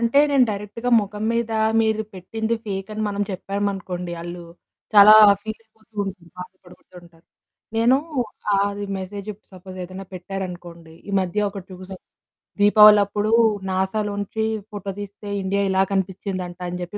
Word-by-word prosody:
అంటే 235 +4 +2
నేను 275 -3 +5
డైరెక్ట్‌గా 210 +4 -4
మొఖం 210 +1 -5
మీద, 230 -1 -1 0.3
మీరు 220 -1 +1
పెట్టింది 220 +5 -3
ఫేక్ 195 -2 -4
అని 215 - -3
మనం 205 0 -2
చెప్పామనుకోండి, 190 -2 -3
ఆళ్ళు 175 0 -7 0.5
చాలా 210 +1 +10 0.3
ఫీలైపోతూ 220 0 -11
ఉంటారు. 190 -3 -8
బాధపడిపోతూ 180 0 -13
ఉంటారు. 170 -1 -21 0.5
నేను 235 +3 +4 0.6
అది 200 +1 -1
మెసేజు 200 +2 -7
ఇప్పుడు 205 - -23
సపోజ్ 185 0 -11
ఏదైనా 185 +2 -9
పెట్టారనుకోండి, 175 -3 -7
ఈ - - -4
మధ్య 190 +3 -1
ఒకటి 195 -2 -9
చూసాం. 185 0 -10 0.6
దీపావళప్పుడు 210 0 +6 0.4
నాసాలోంచి 205 +3 -2 0.3
ఫోటో 200 -1 -5
తీస్తే 205 +1 -9 0.2
ఇండియా 195 +1 0
ఇలా 190 0 +3
కనిపించిందంట 190 -1 -3
అని 180 +1 -5
చెప్పి 180 +4 -6
200 Hz, 130 wpm, -22 LUFS, 185-210 Hz, 0.6 s, చాలా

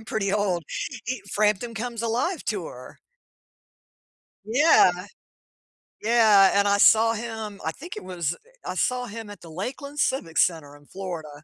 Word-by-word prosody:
I'm - - -14
pretty 200 -3 -2
old. 195 -5 0 0.5
E 255 -4 -2
Frampton 215 +3 +1
Comes 235 +1 -4
Alive 245 +10 -1
tour. - - -6 1.5
Yeah. 255 - +5 1.1
Yeah, 215 -4 +6
and 200 0 +3
I 200 0 +3
saw 225 +2 +6
him, 220 -2 -6
I 160 - -1
think 335 - -9
it - - -7
was, 175 -4 -3 0.3
I - - -3
saw 250 -1 0
him 225 -1 -8
at 205 - -11
the 165 - -12
Lakeland 270 - -6
Civic 185 - 0
Center 155 -4 +1
in 145 0 -19
Florida. 160 -6 -7
210 Hz, 145 wpm, -25 LUFS, 185-235 Hz, 1.5 s, Yeah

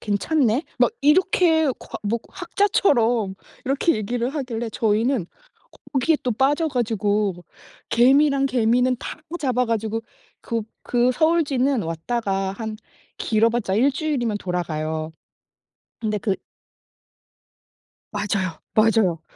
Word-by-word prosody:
괜찮네?" 240 +5 +1 0.2
막 - - +4
이렇게 320 +1 +4
과 - - -8
뭐 225 +3 0
학자처럼 250 - +1 0.3
이렇게 280 +6 +2
얘기를 235 +3 -2
하길래 240 -6 -3
저희는 220 -1 +1 0.7
거기에 290 +4 +2
또 250 - 0
빠져 285 +7 +2
가지고 210 - 0 0.5
개미란 275 +3 +4
개미는 250 0 +2
다 - - -6
끄 345 - -4
잡아 250 -3 +1
가지고 225 0 -1 0.4
그 230 -1 -2 0.2
그 245 +1 +2
서울쥐는 280 -5 +2
왔다가 195 +3 -2
한 220 +1 -5 0.4
길어 220 0 +2
봤자 215 -5 -1
일주일이면 265 -2 +1
돌아가요. 160 -3 -3 0.9
근데 215 -2 -1
그 200 -1 -1 1.8
맞아요. 185 -5 -2
맞아요. 215 -7 +3
235 Hz, 245 characters per minute, -23 LUFS, 210-275 Hz, 1.8 s, 막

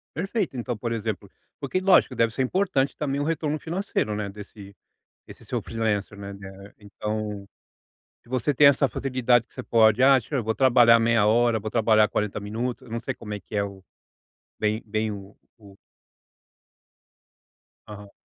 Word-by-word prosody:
Perfeito. 190 - -2
Então, 120 -1 -3
por 115 +1 -4
exemplo 105 -3 -4 0.3
porque 145 +6 -2
lógico 185 -8 +4
deve 115 -1 +1
ser 130 - -2
importante 140 -2 0
também 140 -1 -2
o - - 0
retorno 155 -1 -2
financeiro, 165 - -2
né, 105 -1 -3
desse 100 -1 -12 0.5
desse - - -14
seu - - -3
freelancer, 105 -3 -2
né. 100 0 -7
Eh, 95 +1 -12
então, 105 0 -5 0.8
se - - -24
você 130 +3 0
tem 140 +2 +5
essa 140 0 +5
facilidade 125 -3 +1
que - - -30
você 130 - -6
pode: 110 +1 +3
"Ah, 135 0 +7
deixa 130 +5 -8
eu 120 - -1
vou 110 0 -1
trabalhar 120 -3 +5
meia 115 -2 +3
hora, 115 +1 +3
vou 110 +1 -6
trabalhar 110 -2 +4
40 105 -1 -2
minutos". 115 +5 -4
Não 115 +1 -4
sei 130 +2 -4
como 105 -1 -9
é 100 - -6
que 105 - -8
é 100 - +1
o 100 -1 -9 0.8
bem 110 +1 -1
bem 110 0 -2
o 100 0 -10 0.2
o 100 -2 -16 2.1
Aham. 105 -1 -11
115 Hz, 170 wpm, -25 LUFS, 105-130 Hz, 2.1 s, Ah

